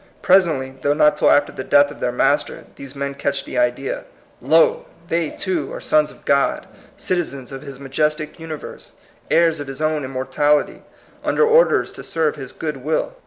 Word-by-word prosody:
Presently, 155 Hz, -8 st, +2 dB
though 145 Hz, +2 st, +1 dB
not 150 Hz, 0 st, +4 dB
till -, -, +3 dB
after 145 Hz, 0 st, +3 dB
the 130 Hz, -, -6 dB
death 145 Hz, +1 st, +4 dB
of 145 Hz, -, -12 dB
their 125 Hz, -, -1 dB
Master, 145 Hz, +4 st, 0 dB
these 140 Hz, 0 st, -10 dB
men 140 Hz, 0 st, -3 dB
catch 140 Hz, 0 st, -2 dB
the 125 Hz, -, -3 dB
idea. 125 Hz, -, -1 dB, 0.4 s
Lol -, -, +3 dB, 0.2 s
they, 165 Hz, -2 st, 0 dB
too, 175 Hz, -7 st, -3 dB
are -, -, -6 dB
sons 150 Hz, 0 st, +2 dB
of -, -, -17 dB
God, 140 Hz, 0 st, +1 dB, 0.3 s
citizens 145 Hz, -8 st, -3 dB
of 135 Hz, -1 st, -7 dB
his 140 Hz, -3 st, -10 dB
majestic 150 Hz, +3 st, -2 dB
universe, 160 Hz, -2 st, -8 dB, 0.4 s
heirs 165 Hz, -2 st, +3 dB
of 145 Hz, -, -6 dB
his 135 Hz, 0 st, -7 dB
own 155 Hz, -1 st, 0 dB
im 130 Hz, -, -5 dB
mortality, 135 Hz, +3 st, 0 dB, 0.4 s
under 460 Hz, -, +2 dB
orders 470 Hz, +2 st, +4 dB
to -, -, -10 dB
serve 160 Hz, -2 st, -1 dB
his 135 Hz, -3 st, -8 dB
good 150 Hz, -3 st, -4 dB
will. 155 Hz, -, -2 dB
145 Hz, 180 wpm, -20 LUFS, 135-160 Hz, 0.4 s, not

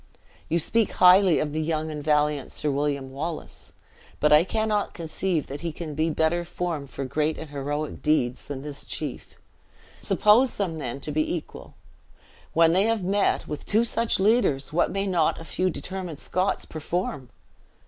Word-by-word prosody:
You 170 Hz, -, +2 dB
speak 220 Hz, +6 st, +1 dB
highly 185 Hz, -1 st, +6 dB
of 150 Hz, -1 st, -1 dB
the 155 Hz, -, -1 dB
young 155 Hz, 0 st, -1 dB
and 150 Hz, -1 st, -6 dB
valiant 150 Hz, -2 st, +1 dB
Sir 150 Hz, -, -1 dB
William 140 Hz, -1 st, -1 dB
Wallace, 155 Hz, +4 st, -6 dB, 0.5 s
but 150 Hz, -, +4 dB
I 150 Hz, +2 st, +7 dB
cannot 215 Hz, +1 st, -1 dB
conceive 165 Hz, 0 st, -2 dB
that 140 Hz, +2 st, -7 dB
he 170 Hz, -1 st, -3 dB
can 155 Hz, 0 st, -6 dB
be 155 Hz, +3 st, 0 dB
better 160 Hz, +2 st, +1 dB
formed 170 Hz, -5 st, -4 dB
for 135 Hz, -, -5 dB
great 150 Hz, +4 st, 0 dB
and 160 Hz, -2 st, -8 dB
heroic 145 Hz, +2 st, -4 dB
deeds 130 Hz, -5 st, +1 dB
than 135 Hz, -1 st, -6 dB
this 145 Hz, -1 st, -5 dB
chief. 150 Hz, -5 st, -5 dB, 0.7 s
Suppose 230 Hz, +5 st, +4 dB
them, 170 Hz, -6 st, -2 dB
then, 135 Hz, -1 st, -5 dB
to 150 Hz, -, -4 dB
be 155 Hz, +1 st, 0 dB
equal, 165 Hz, -, -9 dB, 0.8 s
when 165 Hz, 0 st, +5 dB
they 190 Hz, +3 st, +3 dB
have 225 Hz, -3 st, +1 dB
met, 200 Hz, +2 st, +1 dB
with 150 Hz, -1 st, -5 dB
two 220 Hz, +3 st, +3 dB
such 230 Hz, -2 st, +1 dB
leaders, 190 Hz, -, +2 dB
what 175 Hz, -, +2 dB
may 195 Hz, 0 st, -1 dB
not 175 Hz, -5 st, +1 dB
a 165 Hz, -, -9 dB
few 185 Hz, +2 st, 0 dB
determined 180 Hz, -2 st, -5 dB
Scots 185 Hz, +5 st, -1 dB
perform?" 155 Hz, -4 st, -4 dB
160 Hz, 170 wpm, -25 LUFS, 150-185 Hz, 0.8 s, I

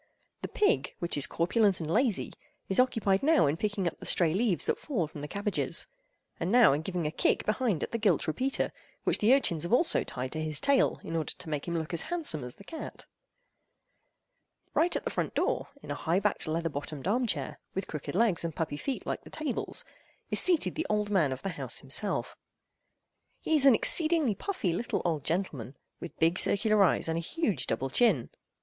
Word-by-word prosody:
The -, -, -3 dB
pig—which 405 Hz, -, 0 dB
is 145 Hz, -, +1 dB
corpulent 195 Hz, +3 st, +2 dB
and 160 Hz, -, -4 dB
lazy—is 220 Hz, -3 st, -1 dB
occupied 220 Hz, -6 st, +2 dB
now 310 Hz, -, +4 dB
in 145 Hz, +1 st, +1 dB
picking 205 Hz, +1 st, -2 dB
up 170 Hz, -, -4 dB
the -, -, -7 dB
stray 165 Hz, -3 st, +3 dB
leaves 195 Hz, -4 st, +1 dB
that -, -, 0 dB
fall 230 Hz, -, -1 dB
from 150 Hz, -1 st, -10 dB
the 145 Hz, -, -5 dB
cabbages, 205 Hz, +5 st, -1 dB, 0.5 s
and 170 Hz, +3 st, -1 dB
now 235 Hz, -, +6 dB
in 145 Hz, -, -1 dB
giving 175 Hz, -1 st, -3 dB
a 150 Hz, -, -1 dB
kick -, -, +1 dB
behind 215 Hz, -, 0 dB
at -, -, -4 dB
the 230 Hz, -, -2 dB
gilt 200 Hz, -7 st, +2 dB
repeater, 260 Hz, -, -1 dB, 0.3 s
which -, -, +1 dB
the 215 Hz, +3 st, +4 dB
urchins 215 Hz, -, +3 dB
have 170 Hz, -, -1 dB
also 325 Hz, +7 st, +3 dB
tied 130 Hz, +1 st, -5 dB
to 155 Hz, -, -3 dB
his 155 Hz, -2 st, 0 dB
tail 280 Hz, -1 st, +2 dB
in 165 Hz, -, -5 dB
order 160 Hz, -2 st, -2 dB
to 180 Hz, -3 st, -9 dB
make 150 Hz, 0 st, -3 dB
him 170 Hz, -1 st, -1 dB
look 160 Hz, +1 st, -4 dB
as 170 Hz, -, 0 dB
handsome 310 Hz, -, 0 dB
as 125 Hz, 0 st, -7 dB
the -, -, -15 dB
cat. 320 Hz, +10 st, -8 dB, 1.7 s
Right 345 Hz, +2 st, +3 dB
at -, -, -2 dB
the -, -, -3 dB
front -, -, -2 dB
door, -, -, 0 dB, 0.2 s
in -, -, -7 dB
a -, -, 0 dB
high 165 Hz, +5 st, 0 dB
backed 205 Hz, -3 st, -1 dB
leather 165 Hz, +2 st, -1 dB
bottomed 145 Hz, +1 st, -6 dB
armed 240 Hz, +3 st, +1 dB
chair, -, -, -3 dB, 0.2 s
with 195 Hz, 0 st, -2 dB
crooked 150 Hz, +2 st, -6 dB
legs 210 Hz, -5 st, +2 dB
and 165 Hz, -2 st, -4 dB
puppy 155 Hz, -3 st, -3 dB
feet 270 Hz, -, -4 dB
like -, -, -3 dB
the -, -, -13 dB
tables, 305 Hz, -6 st, -3 dB, 0.5 s
is -, -, +2 dB
seated 350 Hz, -4 st, +4 dB
the 320 Hz, -, -3 dB
old 210 Hz, -1 st, 0 dB
man 165 Hz, -9 st, +2 dB
of 130 Hz, -, -5 dB
the 195 Hz, -, -2 dB
house 140 Hz, -8 st, -2 dB
himself. 150 Hz, +10 st, -1 dB, 1.0 s
He 320 Hz, -, 0 dB
is 280 Hz, -2 st, +5 dB
an 260 Hz, -, +8 dB
exceedingly 310 Hz, -3 st, +3 dB
puffy 200 Hz, -, -2 dB
little 230 Hz, +7 st, -2 dB
old 160 Hz, -5 st, 0 dB
gentleman, 145 Hz, -, -3 dB, 0.2 s
with 170 Hz, -, -9 dB
big 165 Hz, +3 st, +2 dB
circular 215 Hz, 0 st, +4 dB
eyes 180 Hz, -, +2 dB
and 165 Hz, 0 st, -1 dB
a -, -, -1 dB
huge 230 Hz, -, -1 dB
double 130 Hz, +4 st, -2 dB
chin. 190 Hz, -, +2 dB
185 Hz, 205 wpm, -29 LUFS, 155-235 Hz, 1.7 s, an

